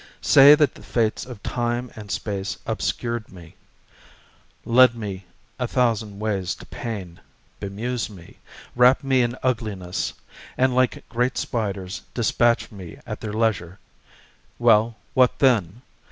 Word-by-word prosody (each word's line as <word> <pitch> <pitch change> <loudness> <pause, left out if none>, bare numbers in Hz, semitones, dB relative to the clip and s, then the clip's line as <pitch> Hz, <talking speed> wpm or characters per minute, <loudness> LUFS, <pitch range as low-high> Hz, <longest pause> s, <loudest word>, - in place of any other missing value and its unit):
Say 140 +2 +8
that 150 -3 +2
the - - -14
fates 110 +3 -1
of 120 -5 -10
time 120 0 -2
and 105 -2 -10
space 100 -1 -3
obscured 115 -2 -3
me, 85 -3 -13 1.1
Led 125 +1 +6
me 100 -4 -6 0.3
a 125 - -1
thousand 115 -5 0
ways 100 -4 -2
to - - -13
pain, 100 -7 -6 0.4
bemused 115 +5 -3
me, 90 -5 -14 0.4
Wrapped 125 +3 +5
me 135 -2 +3
in 120 +1 -1
ugliness; 105 -8 -2 0.4
and 130 0 +3
like 130 0 0
great 125 +2 -1
spiders 100 -4 -3
Dispatched 120 0 +2
me 95 -5 -10
at 110 -3 -6
their 110 - -4
leisure.... 105 -6 -1 0.8
Well, 115 -1 +4 0.2
what 130 -2 +3
then? 115 -4 +2
115 Hz, 130 wpm, -23 LUFS, 100-125 Hz, 1.1 s, Say